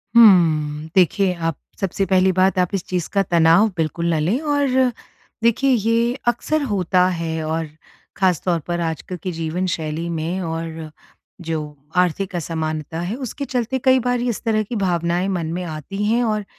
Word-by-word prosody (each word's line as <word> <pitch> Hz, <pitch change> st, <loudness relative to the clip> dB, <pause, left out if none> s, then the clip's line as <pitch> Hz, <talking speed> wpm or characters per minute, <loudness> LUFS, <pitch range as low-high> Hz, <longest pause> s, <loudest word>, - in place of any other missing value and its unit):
हम्म। 160 Hz, -9 st, +5 dB
देखिए, 190 Hz, +1 st, +3 dB
आप 165 Hz, -2 st, -2 dB, 0.2 s
सबसे 195 Hz, 0 st, -1 dB
पहली 190 Hz, 0 st, +3 dB
बात 185 Hz, +1 st, +2 dB
आप 180 Hz, -1 st, +2 dB
इस 195 Hz, -3 st, -1 dB
चीज़ 180 Hz, -3 st, -2 dB
का 200 Hz, -1 st, +3 dB
तनाव 170 Hz, +4 st, +4 dB
बिल्कुल 170 Hz, +1 st, 0 dB
न 160 Hz, -, +1 dB
लें 180 Hz, -, +1 dB
और 275 Hz, -4 st, +2 dB, 0.5 s
देखिए 235 Hz, +4 st, +3 dB
ये 230 Hz, +1 st, +2 dB
अक्सर 305 Hz, +5 st, +1 dB
होता 185 Hz, -2 st, +2 dB
है 160 Hz, -1 st, -2 dB
और 160 Hz, 0 st, -2 dB, 0.5 s
ख़ास 185 Hz, -4 st, +2 dB
तौर 170 Hz, -2 st, +1 dB
पर 175 Hz, 0 st, -1 dB
आजकल 165 Hz, +2 st, -4 dB
के 185 Hz, -, -2 dB
जीवन 165 Hz, +2 st, -2 dB
शैली 160 Hz, +1 st, -3 dB
में 170 Hz, +3 st, -2 dB
और 165 Hz, -2 st, -5 dB, 0.6 s
जो 160 Hz, -1 st, -1 dB, 0.4 s
आर्थिक 180 Hz, +2 st, +1 dB
असमानता 160 Hz, -1 st, -3 dB
है 175 Hz, +6 st, -3 dB
उसके 280 Hz, +4 st, -5 dB
चलते 250 Hz, 0 st, -1 dB
कई 260 Hz, 0 st, +6 dB
बार 245 Hz, -1 st, +1 dB
इस 240 Hz, -3 st, -2 dB
तरह 220 Hz, -2 st, +1 dB
की 225 Hz, +3 st, -6 dB
भावनाएँ 175 Hz, -2 st, 0 dB
मन 175 Hz, -4 st, -2 dB
में 180 Hz, +1 st, -3 dB
आती 170 Hz, +5 st, -5 dB
हैं 230 Hz, +3 st, +2 dB
और 215 Hz, -3 st, -1 dB
180 Hz, 170 wpm, -21 LUFS, 165-215 Hz, 0.6 s, कई